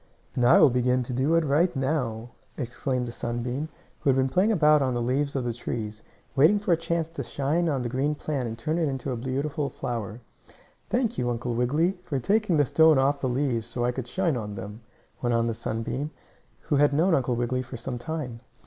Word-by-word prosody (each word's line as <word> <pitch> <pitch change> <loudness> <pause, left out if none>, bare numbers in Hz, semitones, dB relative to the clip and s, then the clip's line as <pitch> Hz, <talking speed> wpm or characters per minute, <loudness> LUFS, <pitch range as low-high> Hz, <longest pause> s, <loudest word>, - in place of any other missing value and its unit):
"And 125 - 0
I 130 - +7
will 140 - +7
begin 125 +1 +2
to 125 - -5
do 135 +6 +2
it 165 -1 +3
right 160 +5 +2
now!" 125 -4 -1 0.3
exclaimed 125 0 -2
the - - -5
sunbeam, 120 +6 -3 0.3
who - - 0
had 135 - +4
been 130 0 +2
playing 185 +10 +3
about 150 -6 +5
on 130 -2 0
the - - 0
leaves 140 +4 0
of 135 - 0
the 120 -1 -2
trees, 110 -2 -5 0.3
waiting 155 +10 +6
for 205 -3 -1
a - - +6
chance 165 0 -1
to 165 - -6
shine 155 +5 0
on 135 -4 0
the - - -1
green 135 +5 0
plant 145 -4 -3
and 115 0 -5
turn 155 +8 -1
it 160 -3 +1
into 135 0 -3
a - - -1
beautiful 140 +4 -2
flower. 115 -2 -4 0.7
"Thank 240 -1 0
you, 120 - 0
Uncle 120 0 -2
Wiggily, 150 +10 +1
for 140 - -2
taking 200 - +2
the 145 - +4
stone 160 +2 +5
off 140 +1 +2
the 130 - 0
leaves 125 -3 0
so 120 -1 -2
I 125 - +2
could 125 -1 -5
shine 170 +1 0
on 105 -4 -4
them," 105 +4 -8 0.4
went 120 -1 +1
on 115 0 +2
the 115 - 0
sunbeam, 115 +6 -3 0.5
who 145 - 0
had 145 0 +4
known 165 +5 +3
Uncle 130 -5 +1
Wiggily 120 +2 -1
for 125 0 -8
some 120 +1 -5
time. 135 -5 -5
130 Hz, 220 wpm, -26 LUFS, 120-155 Hz, 0.7 s, I